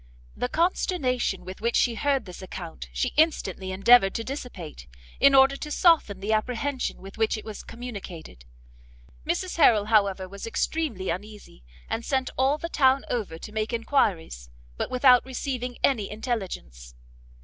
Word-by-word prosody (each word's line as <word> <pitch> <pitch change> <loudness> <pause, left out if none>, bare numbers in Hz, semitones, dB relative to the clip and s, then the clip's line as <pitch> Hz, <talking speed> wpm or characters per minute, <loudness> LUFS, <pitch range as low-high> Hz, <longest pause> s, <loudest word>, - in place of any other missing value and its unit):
The 245 - -2
consternation 275 - 0
with 185 +2 -9
which 235 +1 0
she 240 - +3
heard 275 +3 0
this 180 -1 -10
account 175 -3 -8
she 255 - -1
instantly 195 - +1
endeavoured 195 +1 +5
to 230 - -2
dissipate, 200 - -7 0.3
in 275 0 +6
order 270 +1 +6
to 300 - -6
soften 300 - +3
the 210 +2 0
apprehension 250 +2 -2
with 195 +3 -11
which 220 0 +1
it 215 - -9
was 215 -2 -7
communicated; 200 - -9 0.8
Mrs 350 +2 -2
Harrel, 225 -10 +5
however, 195 -3 +3
was 200 +3 -8
extremely 230 - -2
uneasy, 205 - -8 0.2
and 230 - -3
sent 265 +1 -1
all 270 +3 +2
the 335 - -5
town 270 -4 +3
over 210 -9 -3
to 210 - -10
make 215 +1 -2
enquiries, 185 - 0 0.3
but - - -3
without 255 -1 +5
receiving 255 -1 -4
any 225 -8 +2
intelligence. 180 - -5
230 Hz, 150 wpm, -26 LUFS, 195-265 Hz, 0.8 s, in